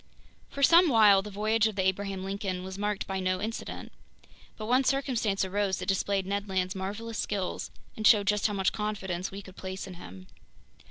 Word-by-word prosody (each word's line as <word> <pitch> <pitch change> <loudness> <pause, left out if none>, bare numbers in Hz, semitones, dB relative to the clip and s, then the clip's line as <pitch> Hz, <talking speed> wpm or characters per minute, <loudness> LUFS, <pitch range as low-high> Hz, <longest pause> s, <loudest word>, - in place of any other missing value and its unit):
FOR 280 - -4
SOME 340 +3 +7
WHILE 210 -5 +6
the 210 - -8
voyage 215 +2 +1
of 215 - -4
the 190 -1 0
Abraham 190 0 -1
Lincoln 195 -2 -3
was 190 0 -6
marked 205 0 -2
by 190 0 -3
no 185 0 0
incident. 220 +3 -5 0.7
But 215 - -5
one 250 +4 +3
circumstance 245 -8 0
arose 195 0 0
that - - -5
displayed 195 0 0
Ned 200 +1 -3
Land's 185 -1 0
marvelous 210 +4 -5
skills 195 -3 -3 0.3
and 215 -1 +2
showed 205 -3 +6
just 210 +1 +2
how 210 - -3
much 195 -1 +1
confidence 195 -4 -3
we 200 +1 -8
could 185 -1 -13
place 190 0 -5
in 190 - -9
him. 95 - -11
200 Hz, 195 wpm, -29 LUFS, 190-215 Hz, 0.7 s, SOME